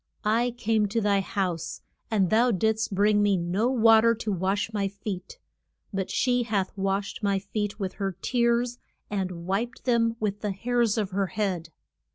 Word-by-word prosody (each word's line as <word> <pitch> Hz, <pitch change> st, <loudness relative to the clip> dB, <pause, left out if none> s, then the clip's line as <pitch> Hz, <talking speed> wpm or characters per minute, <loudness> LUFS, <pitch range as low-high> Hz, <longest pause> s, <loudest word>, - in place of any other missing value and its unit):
I 235 Hz, +3 st, +2 dB
came 220 Hz, -2 st, +1 dB
to 225 Hz, +3 st, 0 dB
thy 205 Hz, -2 st, +2 dB
house, 185 Hz, -4 st, -3 dB, 0.3 s
and 195 Hz, -5 st, +1 dB
thou 235 Hz, +3 st, +4 dB
didst 220 Hz, 0 st, 0 dB
bring 205 Hz, +1 st, +4 dB
me 205 Hz, -2 st, +3 dB
no 180 Hz, +7 st, 0 dB
wa 225 Hz, -3 st, +6 dB
ter 230 Hz, 0 st, +4 dB
to 215 Hz, -1 st, -3 dB
wash 195 Hz, +4 st, -1 dB
my 200 Hz, -2 st, 0 dB
feet, 200 Hz, -, -6 dB, 0.6 s
but 195 Hz, -1 st, -2 dB
she 250 Hz, -1 st, +2 dB
hath 205 Hz, -5 st, -1 dB
washed 195 Hz, +1 st, -2 dB
my 200 Hz, -2 st, +1 dB
feet 205 Hz, +2 st, -3 dB
with 190 Hz, -2 st, -3 dB
her 195 Hz, -2 st, -2 dB
tears 240 Hz, +1 st, +1 dB, 0.3 s
and 185 Hz, -4 st, -3 dB
wiped 220 Hz, +7 st, -2 dB
them 230 Hz, -2 st, +2 dB
with 205 Hz, -1 st, -2 dB
the 210 Hz, -2 st, -1 dB
hairs 235 Hz, +2 st, +1 dB
of 205 Hz, -3 st, -1 dB
her 195 Hz, +1 st, 0 dB
head. 180 Hz, -3 st, -2 dB
205 Hz, 175 wpm, -26 LUFS, 195-225 Hz, 0.6 s, wa